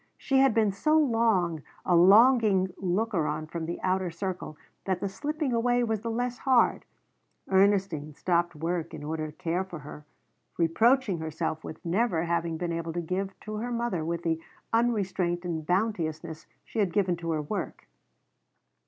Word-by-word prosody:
She 270 Hz, -2 st, +1 dB
had 270 Hz, -4 st, +4 dB
been 215 Hz, -3 st, +3 dB
so 305 Hz, +11 st, +2 dB
long 225 Hz, -, +2 dB, 0.2 s
a 180 Hz, -, +3 dB
longing 200 Hz, 0 st, +5 dB
looker 190 Hz, -2 st, 0 dB
on 155 Hz, +1 st, -2 dB
from 160 Hz, +1 st, -5 dB
the 170 Hz, -, -4 dB
outer 185 Hz, -1 st, +1 dB
circle 175 Hz, -2 st, -5 dB, 0.3 s
that 190 Hz, -2 st, 0 dB
the 200 Hz, -, -2 dB
slipping 295 Hz, -, -2 dB
away 245 Hz, +1 st, +2 dB
was 220 Hz, -3 st, -1 dB
the 230 Hz, -, -3 dB
less 245 Hz, +2 st, -2 dB
hard. 260 Hz, -3 st, +3 dB, 0.6 s
Ernestine 190 Hz, -6 st, +2 dB
stopped 175 Hz, 0 st, 0 dB
work 165 Hz, +1 st, -3 dB
in 150 Hz, -, -8 dB
order 155 Hz, 0 st, -3 dB
to 150 Hz, -, -16 dB
care 180 Hz, +1 st, -1 dB
for 185 Hz, -2 st, -8 dB
her, 150 Hz, 0 st, -10 dB, 0.5 s
reproaching 210 Hz, +4 st, +3 dB
herself 160 Hz, 0 st, -3 dB
with 155 Hz, -, -9 dB
never 175 Hz, -1 st, +1 dB
having 170 Hz, -1 st, -1 dB
been 170 Hz, 0 st, -2 dB
able 165 Hz, 0 st, -3 dB
to 175 Hz, -, -2 dB
give 190 Hz, +3 st, -3 dB
to 215 Hz, 0 st, -6 dB
her 240 Hz, +3 st, -3 dB
mother 235 Hz, -8 st, -1 dB
with 170 Hz, +1 st, -3 dB
the 165 Hz, -1 st, 0 dB, 0.3 s
unrestraint 195 Hz, -7 st, +1 dB
and 160 Hz, -3 st, -3 dB
bounteousness 170 Hz, -5 st, -1 dB, 0.2 s
she -, -, -5 dB
had 195 Hz, -5 st, +1 dB
given 190 Hz, -4 st, +2 dB
to 165 Hz, 0 st, -5 dB
her 155 Hz, -2 st, 0 dB
work. 145 Hz, -, -5 dB
185 Hz, 170 wpm, -28 LUFS, 165-225 Hz, 0.6 s, longing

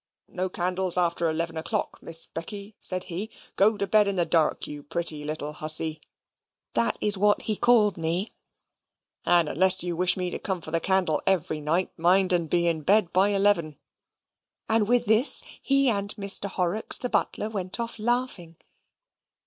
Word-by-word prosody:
"No 185 Hz, +1 st, -4 dB
candles 180 Hz, 0 st, +1 dB
after 170 Hz, -1 st, 0 dB
eleven 165 Hz, +1 st, -3 dB
o'clock, 160 Hz, -, -4 dB
Miss 165 Hz, 0 st, -2 dB
Becky," 200 Hz, +5 st, -8 dB
said 185 Hz, -1 st, +6 dB
he. 185 Hz, +6 st, -5 dB, 0.3 s
"Go 210 Hz, +2 st, +2 dB
to 200 Hz, -, -2 dB
bed 210 Hz, +1 st, +2 dB
in 200 Hz, -, -1 dB
the 175 Hz, -2 st, +1 dB
dark, 160 Hz, -2 st, 0 dB
you 145 Hz, 0 st, -8 dB
pretty 155 Hz, 0 st, +1 dB
little 150 Hz, 0 st, -6 dB
hussy" 155 Hz, 0 st, +1 dB, 0.7 s
(that 115 Hz, 0 st, +1 dB
is 205 Hz, -2 st, 0 dB
what 205 Hz, +1 st, +2 dB
he 215 Hz, -, 0 dB
called 215 Hz, -3 st, +2 dB
me), 170 Hz, +6 st, 0 dB, 0.9 s
"and 170 Hz, -2 st, +3 dB
unless 185 Hz, +4 st, +3 dB
you 175 Hz, -1 st, -3 dB
wish 180 Hz, +2 st, +3 dB
me 180 Hz, -1 st, -3 dB
to -, -, -5 dB
come 190 Hz, -2 st, -4 dB
for 155 Hz, -, -6 dB
the 165 Hz, -, +2 dB
candle 185 Hz, -3 st, 0 dB
every 170 Hz, -5 st, 0 dB
night, 165 Hz, +5 st, -1 dB
mind 185 Hz, +2 st, +3 dB
and 170 Hz, -3 st, -1 dB
be 170 Hz, +1 st, 0 dB
in 165 Hz, -2 st, -1 dB
bed 195 Hz, +3 st, +2 dB
at 195 Hz, +2 st, +3 dB
eleven." 195 Hz, -7 st, +1 dB, 0.9 s
And 220 Hz, -2 st, +1 dB
with 245 Hz, +1 st, +2 dB
this, 220 Hz, +6 st, +3 dB, 0.2 s
he 275 Hz, 0 st, +1 dB
and 205 Hz, -3 st, 0 dB
Mr. 200 Hz, -1 st, 0 dB
Horrocks 185 Hz, +3 st, +1 dB
the 250 Hz, -, -3 dB
butler 220 Hz, -2 st, -2 dB
went 190 Hz, 0 st, -1 dB
off 230 Hz, -1 st, -5 dB
laughing. 230 Hz, -7 st, -2 dB
185 Hz, 175 wpm, -25 LUFS, 165-205 Hz, 0.9 s, said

